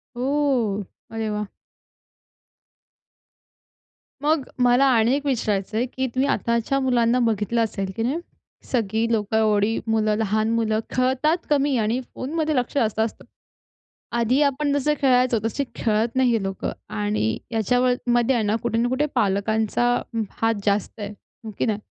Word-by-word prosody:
ओह! 250 -6 0 0.3
अरे 225 -1 -3
वाह! 210 0 -2 2.8
मग 300 -2 +1 0.2
मला 245 +2 +5
आणि 230 +3 +3
एक 285 0 -3
विचारायचंय, 220 -3 0
की 260 +1 -3
तुम्ही 265 +2 +2
आताच्या 235 +2 0
मुलांना 245 -2 +2
बघितलं 225 -1 +1
असेल, 195 -3 -3
की 225 - -2
नाही. 265 +7 0 0.5
सगळी 225 -1 0
लोकं 220 -1 0
एवढी 215 0 +2
मुलं 215 -1 +2
लहान 215 0 0
मुलं 220 -1 +1 0.2
खेळतात 260 +6 +2
कमी, 285 -1 +2
आणि 225 +3 +1 0.2
फोनमध्ये 310 +3 -1
लक्ष 250 -2 -1
जास्त 220 -5 +1
असतं. 220 0 -2 0.9
आधी 235 +4 +2
आपण 285 0 +1
जसं 285 +1 +1
खेळायचो 250 -3 +3
तसे 230 +5 -1
खेळत 225 +2 0
नाही 260 -1 +4
हे 225 -3 +1
लोकं 195 0 -3 0.3
आणि 105 +1 0
याच्यावर 245 +3 +2 0.2
मध्ये 240 +2 +3
आहे 230 -3 +1
ना 210 +1 +1
कुठे 230 -1 0
ना 240 +1 +2
कुठे 260 +4 +1
पालकांचा 220 +1 +1 0.6
हात 225 0 +2
जास्त 205 +2 0
आहे. 205 - -4 0.4
हो 220 - -5
की - - +1
नाही. 215 -3 0
230 Hz, 145 wpm, -23 LUFS, 215-260 Hz, 2.8 s, मला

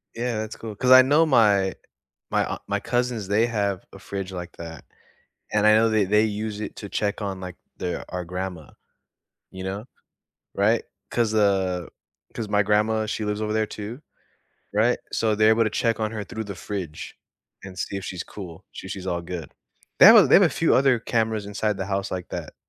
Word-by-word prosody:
Yeah. 120 -1 -2
That's 110 0 -5
cool, 110 -2 -8
'cause 130 +3 +1
I 130 0 +11
know 145 +5 +4
my 105 -8 +3 0.6
my - - +2
aun - - -4
my 100 0 -1
cousins, 120 -3 -1
they 110 +3 +3
have 100 -5 -1
a 95 - -11
fridge 95 0 -6
like 90 -1 -6
that. 80 -1 -9 0.7
And 105 0 +2
I 105 - +7
know 110 +1 +4
they 110 -3 +2
they 105 +3 +3
use 105 0 -3
it 105 - -6
to 100 - -7
check 105 +1 -2
on, 95 -2 -3
like, 90 -1 -7 0.2
their 90 -1 -3
our 90 -1 -4
grandma, 90 -3 -6 0.8
you 95 0 -8
know? 100 +3 -4 0.7
Right? 110 +4 +2 0.3
'Cause, 115 -2 +1
uh, 95 -4 +1 0.5
'cause 110 -3 -5
my 105 0 +3
grandma, 105 +2 +2
she 110 0 -3
lives 105 +1 -2
over 105 0 -1
there 110 0 +1
too, 110 +6 -7 0.7
right? 110 +4 +2
So, 110 -2 +1
they're 110 +1 +4
able 115 +1 +4
to 110 - 0
check 115 +1 0
on 110 0 -2
her 105 - -4
through 110 +1 -6
the 100 -1 -6
fridge 90 -4 -6 0.5
and 95 -1 -10
see 100 - -3
if 95 - -5
she's 90 -2 -5
cool. 90 -5 -10
She 95 - -9
she's 95 -1 -6
all 85 -1 -2
good. 85 -2 -7 0.5
They - - +10
have - - +10
a - - +8
they - - +4
have - - +6
a - - +6
few - - +2
other 130 -2 +4
cameras 110 -3 -1
inside 105 +1 -1
the 95 -1 -4
house 100 0 -2
like 90 -1 -4
that, - - -6
105 Hz, 205 wpm, -24 LUFS, 95-110 Hz, 0.8 s, I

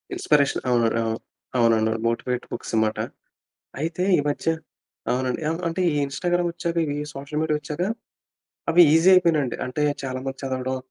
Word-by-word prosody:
Inspiration 150 - +2
అవునండి 115 -2 +2
అవును. 110 0 -2 0.4
అవునండి. 115 -2 +3 0.2
Motivate 125 +1 -1
books - - -6
అమాట. 110 0 +1 0.8
అయితే 165 +3 -2 0.2
ఈ - - +4
మధ్య 145 - -3 0.6
అవునండి 130 +4 -1
ఆహ్, 165 - -3
అంటే 165 +3 -3
ఈ - - -1
ఇన్‌స్టాగ్రామొచ్చాక 170 +3 -1
ఇవి 145 -1 -2 0.2
సోషల్ 140 +2 -4
మీడియా 155 -1 +1
వచ్చాక 150 +3 -5 0.9
అవి 175 +2 +7
ఈజీ 165 +3 +5
అయిపోయినాయండి. 160 -8 +3
అంటే 130 +4 -2 0.2
చాలా 130 -1 -3
మంది 135 0 -4
చదవడం 130 0 -2
140 Hz, 145 wpm, -24 LUFS, 125-165 Hz, 0.9 s, అవి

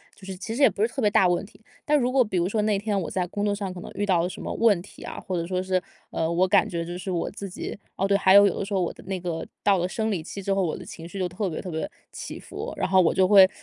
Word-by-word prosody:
就 195 - -14
是 190 -1 -6
其 210 +4 -5
实 275 - -2
也 - - +8
不 - - -6
是 220 - +4
特 270 - -4
别 210 - +4
大 195 -2 +4
的 175 - +3
问 175 - -2
题。 215 - -19 0.2
但 300 0 +4
如 250 -2 +1
果 260 -1 +5
比 195 -3 -2
如 175 +1 +1
说， 215 +1 0
那 210 -1 +2
天 205 0 -1
我 170 - -3
在 185 -2 -1
工 205 +3 -2
作 205 - +1
上 200 -2 -4
可 180 - -8
能 - - -8
遇 205 - -1
到 185 -4 +3
了 175 - 0
什 - - -8
么 - - -4
问 215 -6 +3
题 190 - -13
啊， - - -7
或 185 -2 -3
者 165 - -2
说 185 0 -1
是， 185 -1 +1 0.3
呃， 160 0 -1
我 180 +2 +3
感 - - +4
觉 170 -1 -3
就 175 +1 -5
是 185 - -6
我 175 -2 -1
自 200 0 -7
己 180 - -6 0.2
哦， 195 - 0
对， 200 0 +4
还 190 -1 +5
有 200 +1 +9
有 190 - -1
的 - - -2
时 205 - -5
候 190 - +2
我 175 - -1
的 - - -15
那 190 0 -3
个 170 -2 -4 0.2
到 200 -1 +4
了 180 0 0
生 220 +3 -2
理 185 -5 -1
期 200 +4 -7
之 195 +1 0
后， 195 - +1
我 165 - -1
的 - - -9
情 165 - -9
绪 195 +3 -7
就 185 - 0
特 190 +2 -2
别 155 - -4
特 185 - -7
别 160 -1 -3 0.2
起 - - -7
伏， - - -7
然 - - 0
后 190 0 +5
我 165 - +3
就 190 -1 +4
会 195 -1 +8
190 Hz, 370 characters per minute, -25 LUFS, 180-205 Hz, 0.3 s, 有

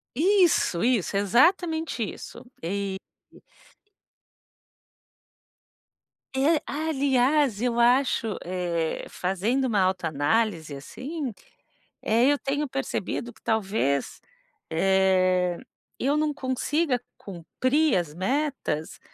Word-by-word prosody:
Isso, 345 - +3
isso 230 -6 +1
exatamente 320 - +2
isso 210 - -7 0.2
e 195 +3 -2 0.3
e - - -18 3.0
É 295 +4 +3
aliás, 280 -5 +1
eu 240 -1 +1
acho, 240 -3 +2
eh, 175 -2 -2
fazendo 200 +9 -1
uma 215 -5 +1
autoanálise, 165 -1 0
assim, 265 - -6 0.7
eu 245 +6 +3
tenho 285 +2 -2
percebido, 250 -3 -3
que 220 - -23
talvez, 195 -10 -1 0.5
eh, 185 0 +2 0.4
eu 280 +4 +1
não 300 -1 +1
consiga, 265 +1 -1 0.2
cumprir 255 - 0
as 165 -4 -3
metas, 255 - -2
235 Hz, 85 wpm, -26 LUFS, 185-280 Hz, 3.0 s, Isso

